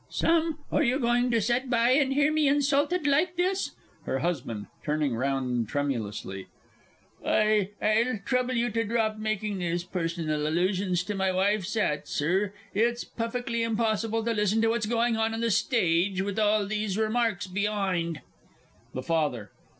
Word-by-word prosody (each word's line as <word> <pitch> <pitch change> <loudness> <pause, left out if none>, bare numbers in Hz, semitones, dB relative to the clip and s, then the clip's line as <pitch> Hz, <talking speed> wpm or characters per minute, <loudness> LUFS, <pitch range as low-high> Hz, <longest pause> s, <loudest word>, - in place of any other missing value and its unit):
Sam, 325 -1 +1
are - - +2
you 260 -3 +2
going 245 0 +2
to 230 -1 +2
set 240 +4 0
by 235 0 +3
and 270 0 +3
hear 290 +2 +2
me 310 -2 +3
insulted 290 +4 +2
like 305 +6 +2
this? 370 +2 -1 0.3
HER - - 0
HUSBAND 130 -9 -3 0.2
(turning 150 -3 0
round 125 -3 -1
tremulously). 110 -9 -3 0.8
I 215 -2 +2
I'll 225 +3 +2
trouble 255 +1 0
you 240 0 +1
to 230 +2 0
drop 220 -1 0
making 215 -2 -2
these 175 -1 -1
personal 165 -4 -2
allusions 180 +2 0
to 205 - -4
my 190 -1 0
wife's 200 +2 0
'at, 150 -9 0
Sir. 185 +7 0 0.2
It's 235 +3 +1
puffickly 235 +1 -3
impossible 225 0 0
to 230 - +1
listen 210 0 +1
to 225 - +3
what's 230 -1 0
going 230 0 +1
on 225 0 0
on 225 - -3
the 230 -1 +1
stage 190 -4 +2
with 200 +1 -3
all 210 -1 +3
these 210 -1 -2
remarks 220 -3 0
be'ind! 190 -4 -1 0.7
THE 130 - -3
FATHER. 145 -10 -1
215 Hz, 160 wpm, -27 LUFS, 175-235 Hz, 0.8 s, by